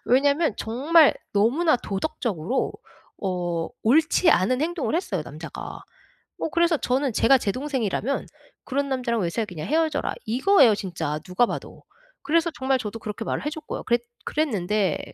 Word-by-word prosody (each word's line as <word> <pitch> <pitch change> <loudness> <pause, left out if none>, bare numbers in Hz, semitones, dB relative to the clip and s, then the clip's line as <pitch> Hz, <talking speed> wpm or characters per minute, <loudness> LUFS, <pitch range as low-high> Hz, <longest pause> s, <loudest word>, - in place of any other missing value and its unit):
왜냐하면 280 +2 +3
정말 290 +7 +4 0.2
너무나 255 +11 +3
도덕적으로 210 - -2 0.5
어 175 -3 -2
옳지 315 +7 +4
않은 250 +7 +2
행동을 330 -2 -1
했어요 195 - -2
남자가. 155 +3 -8 0.6
뭐 - - -2
그래서 340 0 +3
저는 260 0 0
제가 265 +3 +5
제 210 - -1
동생이라면 260 -2 -2 0.4
"그런 280 +1 -1
남자랑 245 -4 -1
왜 170 - 0
사귀냐? 180 -7 -4
헤어져라." 315 +1 0
이거예요 255 - +5
진짜 170 -6 -3
누가 185 +7 +2
봐도. - - -7 0.4
그래서 330 +3 +2
정말 265 0 +1
저도 225 -1 -5
그렇게 215 +1 -5
말을 - - -3
해 - - 0
줬고요. 310 0 -6
그랬 240 -1 +1 0.2
그랬는데 210 - 0
250 Hz, 345 characters per minute, -24 LUFS, 200-300 Hz, 0.6 s, 제가